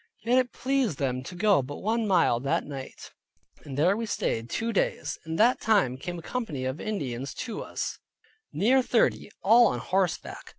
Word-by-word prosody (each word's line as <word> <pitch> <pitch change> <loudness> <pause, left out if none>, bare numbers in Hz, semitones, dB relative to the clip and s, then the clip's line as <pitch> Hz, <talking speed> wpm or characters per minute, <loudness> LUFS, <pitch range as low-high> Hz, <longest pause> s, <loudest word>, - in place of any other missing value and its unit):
Yet 245 +3 +4
it 250 -1 0
pleased 260 - 0
them 130 -2 -1
to 180 - -8
go 200 -3 +4
but 140 +3 -7
one 225 +1 0
mile 170 - +3
that 135 +2 0
night, 135 -2 -8 0.5
and 135 -1 -7
there 175 +7 +4
we 230 +1 -3
stayed 115 - -2
two 230 +1 -2
days. - - -1
In 160 - -3
that 235 +7 +3
time 200 - +3
came 175 +6 -5
a 165 - -9
company 160 - -4
of 130 +4 -3
Indians 135 - -4
to 235 - -5
us, - - -4 0.5
near 240 - +3
thirty, 240 -4 +1
all 230 +4 +7
on - - -1
horseback. 185 -2 -2
190 Hz, 180 wpm, -27 LUFS, 140-230 Hz, 0.5 s, all